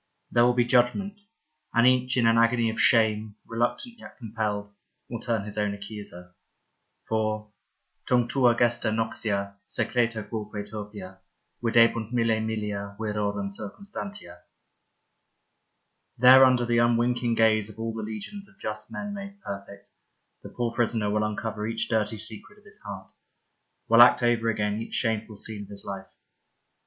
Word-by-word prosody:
There 120 - +4
will 125 0 +3
be 120 -1 +3
judgment, 130 - +1 0.5
and 120 +1 +5
each, 125 0 +3
in 120 - +3
an 115 0 +5
agony 115 0 +3
of 110 - -2
shame, 110 -2 +3
reluctant 120 - -2
yet - - -13
compelled, 105 -3 -3 0.3
will 115 - -5
turn 115 -3 -1
his 105 0 -5
own 105 -1 0
accuser. 100 -4 -10 0.7
For 110 -1 -1 0.6
Tunc 120 -1 +2
tua 125 -3 +3
gesta 120 -2 +2
noxia 110 -3 -2
Secreta 115 -3 -1
quoque 105 -1 -5
turpia 105 -3 -8 0.4
Videbunt 115 -1 +3
mille 115 -2 +2
millia 105 -2 -3
Virorum 100 -2 -2
circumstantia. 200 - -7 1.8
There 130 +2 +9
under 125 -2 +3
the 120 0 +2
unwinking 120 0 +2
gaze 110 -2 +3
of 110 - -13
all 115 0 -3
the 110 - -5
legions 110 - -7
of 190 - -24
just 110 0 -5
men 205 0 -5
made 200 0 -8
perfect, 100 - -8 0.5
the - - -10
poor 120 -1 -2
prisoner 110 -3 0
will 105 +1 +1
uncover 105 0 -3
each 115 0 -2
dirty 110 -1 0
secret 110 - -7
of 210 - -23
his 200 - -15
heart, 95 -2 -9 0.8
will 115 +1 +7
act 120 0 +7
over 115 -1 +2
again 105 0 -1
each - - -6
shameful 110 -2 -1
scene 105 +1 -5
of 100 - -10
his 100 -1 -9
life. 95 -1 -7
110 Hz, 150 wpm, -26 LUFS, 105-120 Hz, 1.8 s, There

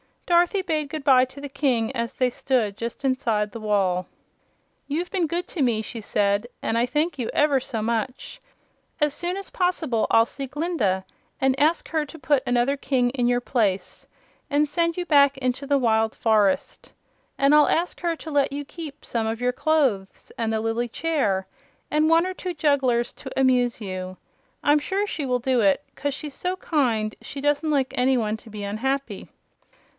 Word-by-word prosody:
Dorothy 350 +3 +3
bade 310 -5 -1
good 310 0 -5
bye 260 -2 +6
to 260 +2 -12
the 285 - -6
King 265 -5 0
as 235 -1 -2
they 255 -1 +1
stood 235 -6 0
just 235 +4 -5
inside 230 -6 0
the 230 - -7
wall. 195 -4 0 0.8
"You've 335 +5 -2
been 365 -4 0
good 345 +3 -2
to 330 - -3
me," 230 -4 +2
she 225 +1 -7
said, 205 +1 0
"and 225 - -1
I 235 +1 +2
thank 295 +3 -1
you 235 - -2
ever 290 -2 +3
so 230 -4 -4
much. 235 +3 -3 0.6
As 295 -1 +2
soon 350 +4 -2
as 395 - -6
poss'ble 330 - 0
I'll 225 0 +5
see 275 +3 -6
Glinda 260 - -1 0.3
and 265 0 +2
ask 315 +3 +2
her 315 -2 0
to 310 +3 -11
put 285 -1 +2
another 245 +3 +2
King 255 -3 +1
in 245 -2 0
your 245 0 +2
place 200 -7 -1 0.4
and 295 0 +2
send 335 +3 0
you 355 - -2
back 280 -3 +5
into 260 +1 -2
the 285 0 +3
wild 225 -3 +2
forest. 210 -4 +1 0.4
And 275 +1 +4
I'll 300 0 +6
ask 345 +2 0
her 340 -1 -1
to 320 0 -9
let 280 -1 +2
you 290 0 -4
keep 310 -1 -9
some 225 -2 -1
of 225 +1 -3
your 250 0 +2
clothes 270 -11 0
and 225 -1 -1
the 220 -1 0
lily 225 +2 -1
chair 230 -9 0 0.5
and 305 +1 +3
one 330 +1 +4
or 370 - -3
two 365 -1 -5
jugglers 270 -6 +1
to 265 -1 -6
amuse 250 -3 +2
you. 185 -2 -5 0.5
I'm 295 +1 +4
sure 390 +7 -1
she 305 -8 -3
will 250 -1 +1
do 255 0 +1
it, 200 +5 +3
'cause 285 -1 -3
she's 295 -2 -6
so 365 +5 -2
kind 240 -12 0
she 280 - -7
doesn't 290 +2 +1
like 275 -4 +1
any 255 +1 +3
one 215 -2 -1
to 225 - -15
be 210 -1 -7
unhappy." 265 +7 -3
265 Hz, 190 wpm, -24 LUFS, 230-300 Hz, 0.8 s, bye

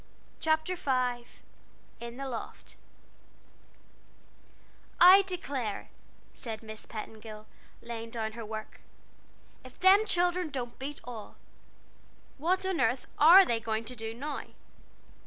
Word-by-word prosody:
CHAPTER 315 +3 +1
V 250 -6 -1 0.7
IN 235 +1 -8
THE 275 0 -4
LOFT 240 -4 -7 2.2
"I 370 +3 +10
declare," 280 - -4 0.4
said 225 -3 -6
Miss 215 -1 -9
Petingill, 215 0 -8 0.4
laying 230 -1 -6
down 225 -1 -3
her 230 +1 -7
work, 215 0 -7 0.8
"if 255 -1 -14
them 395 +3 +6
children 355 -1 +1
don't 245 -4 -5
beat 280 +2 -6
all! 225 -3 -9 1.0
What 370 +5 +1
on 380 -3 -1
airth 250 - +1
are 350 +6 +9
they 235 -6 0
going 220 0 -2
to 250 - -7
do 225 -1 -6
now?" 290 +4 -4
250 Hz, 115 wpm, -30 LUFS, 225-330 Hz, 2.2 s, I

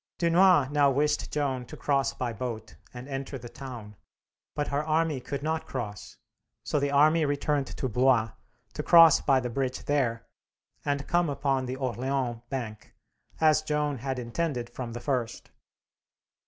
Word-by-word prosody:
Dunois 170 -3 +4
now 145 -1 +4
wished 145 +3 0
Joan 135 -4 -1
to - - -10
cross 140 -2 +1
by 120 -2 -4
boat 110 -1 -6 0.2
and 125 +1 -9
enter 135 0 -5
the 120 -1 -9
town, 120 -6 -9 0.6
but 145 - -2
her 140 +2 0
army 155 -2 +1
could 140 +2 -5
not 160 +1 -2
cross, 105 -3 -6 0.5
so 150 - 0
the 140 0 0
army 155 +3 +4
returned 145 -1 0
to 130 - -4
Blois, 125 -2 +2 0.4
to - - -3
cross 165 -2 +7
by 135 -2 +3
the 125 -1 -4
bridge 130 0 -3
there, 120 -5 0 0.6
and 140 -1 -2
come 175 -2 +2
upon 135 -2 -1
the 130 - -3
Orleans 130 -1 -2
bank, 110 -5 -6 0.4
as 155 -1 +4
Joan 150 -3 -1
had 130 +1 -3
intended 125 0 -3
from 120 -3 -6
the 120 - -5
first. 125 -5 -3
135 Hz, 155 wpm, -28 LUFS, 125-150 Hz, 0.6 s, cross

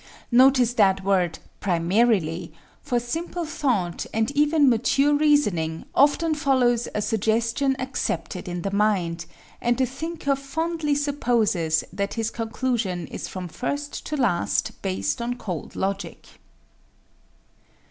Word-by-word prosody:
Notice 250 -1 +5
that 195 -4 +3
word 185 -4 +1 0.2
"primarily," 175 -2 +1 0.3
for 250 -5 0
simple 330 +8 -4
thought, 245 - -1
and 225 +3 0
even 295 +1 +3
mature 270 +4 +3
reasoning, 210 - +2
often 305 +3 +3
follows 255 -5 +2
a 210 - 0
suggestion 230 +6 +1
accepted 260 -6 -3
in 175 -1 -4
the 195 - -2
mind, 190 -5 0 0.3
and 240 0 +1
the 260 - +3
thinker 285 +2 -2
fondly 300 +2 -2
supposes 230 - +1
that 200 +1 -2
his 225 -1 -1
conclusion 225 -6 -2
is - - -5
from 185 -1 -6
first 285 - -4
to 300 - -2
last 190 - 0
based 95 - -2
on 240 +1 -2
cold 185 -10 -6
logic. 195 +1 -3
235 Hz, 120 wpm, -24 LUFS, 190-280 Hz, 0.3 s, Notice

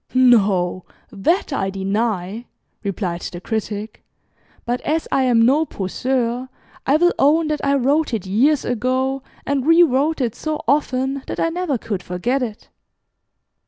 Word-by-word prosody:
"No, 200 -8 +3 0.3
that 285 - 0
I 195 -8 -1
deny," 200 +2 -2 0.4
replied 185 -4 -3
the 175 - -6
Critic, 215 +1 -4 0.6
"but 245 +1 -1
as 315 +2 -1
I 265 - +2
am 230 -2 +4
no 280 +6 +4
poseur, 245 +2 -2 0.4
I 275 - +4
will 350 +2 +3
own 310 +3 +3
that 300 -1 -2
I 280 0 +2
wrote 280 +4 +1
it 220 -6 -3
years 260 +10 +2
ago, 255 +3 0 0.2
and 280 -1 -1
rewrote 320 -2 +4
it 240 -5 0
so 310 -1 -3
often 270 -1 +1
that - - -5
I 330 - +2
never 335 -5 -1
could 205 -4 -4
forget 230 +11 -1
it. 225 -4 -5
255 Hz, 145 wpm, -20 LUFS, 210-280 Hz, 0.6 s, am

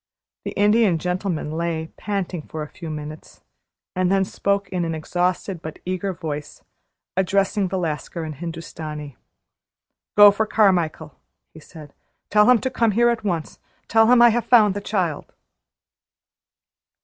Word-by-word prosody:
The - - -4
Indian 205 -3 +3
Gentleman 180 -2 -3
lay 160 0 -3
panting 195 -4 -3
for 155 -1 -5
a - - -7
few 165 -2 -9
minutes, 155 0 -8 0.5
and 185 0 +1
then 195 0 +3
he 190 - -6
spoke 200 0 0
in 180 -2 -2
an 165 -1 -2
exhausted 180 +2 -2
but 160 -1 -7
eager 185 +2 -2
voice, 150 -4 -7 0.5
addressing 195 +1 +1
the 190 - -3
Lascar 165 -1 -4
in 155 - -5
Hindustani: 155 -2 -7 1.0
"Go 205 0 +10
for 215 +2 -1
Carmichael," 175 -8 +1 0.3
he 160 - -12
said. 155 -2 -13 0.4
"Tell 210 +2 +5
him 250 - +7
to 260 - -2
come 230 -4 +1
here 240 +3 +4
at 235 -2 -1
once. 170 -6 -3 0.3
Tell 225 0 +4
him 245 -1 +7
I 240 - +8
have 235 +1 0
found 215 -5 +5
the 205 - -5
child!" 185 -7 -2
180 Hz, 150 wpm, -22 LUFS, 160-205 Hz, 1.0 s, Go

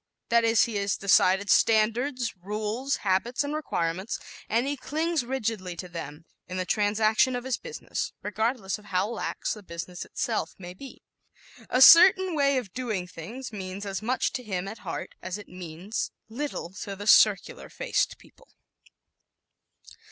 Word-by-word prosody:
That 235 0 +4
is, 225 -1 +4
he 225 -3 -2
has 200 0 0
decided 195 0 +4
standards, 230 +3 +2
rules, 215 +8 -2
habits 200 +8 +1
and 285 +1 -3
requirements, 190 - -2 0.3
and 230 +3 +2
he 285 +1 -1
clings 315 +2 -1
rigidly 225 -8 -3
to 180 - -7
them 160 -2 -8 0.2
in 185 - -5
the 185 - -1
transaction 215 +5 +2
of 245 - -3
his 260 -2 -1
business, 480 -2 -5
regardless 215 0 -1
of 210 - -18
how 190 0 0
lax 235 - -3
the 210 - -10
business 175 -1 -7
itself 230 - -3
may 180 -1 -9
be. 265 +8 -12 0.7
"A 255 - +6
certain 375 +3 +8
way 280 -2 +3
of 220 -8 -4
doing 220 -8 -2
things" 220 +10 -8
means 195 0 -6
as 195 0 -3
much 250 +4 0
to 255 - -3
him, 195 -5 -3
at 220 +3 -7
heart, 170 - -6
as 185 +2 -4
it 210 - -11
means 180 +3 -5 0.2
little 240 -7 -4
to 200 - -5
the 205 +1 -8
circular 210 -2 +4
faced - - -1
people. - - -21
215 Hz, 160 wpm, -27 LUFS, 190-255 Hz, 0.7 s, certain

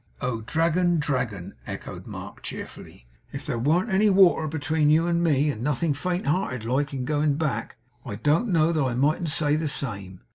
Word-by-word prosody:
'Oh, 115 -3 -2
Dragon, 170 +6 +1
Dragon!' 125 - -2
echoed - - -7
Mark, - - -9
cheerfully, - - -8 0.3
'if - - -7
there 115 - -2
warn't 170 - +1
any 205 +3 +4
water 185 -5 +5
between 155 0 0
you 160 +2 +4
and 170 0 +1
me, 150 -2 +2
and 110 - -7
nothing 145 +3 0
faint 180 +6 -2
hearted 140 - -1
like 135 +4 0
in 130 -3 -4
going 150 0 +1
back, 150 -3 -2 0.3
I 115 -6 -6
don't 150 - +1
know 165 -4 +3
that 160 -2 0
I 130 -3 0
mightn't 155 +6 +1
say 150 -1 +2
the 155 0 -1
same. 100 -10 -3
150 Hz, 185 wpm, -25 LUFS, 130-165 Hz, 0.3 s, water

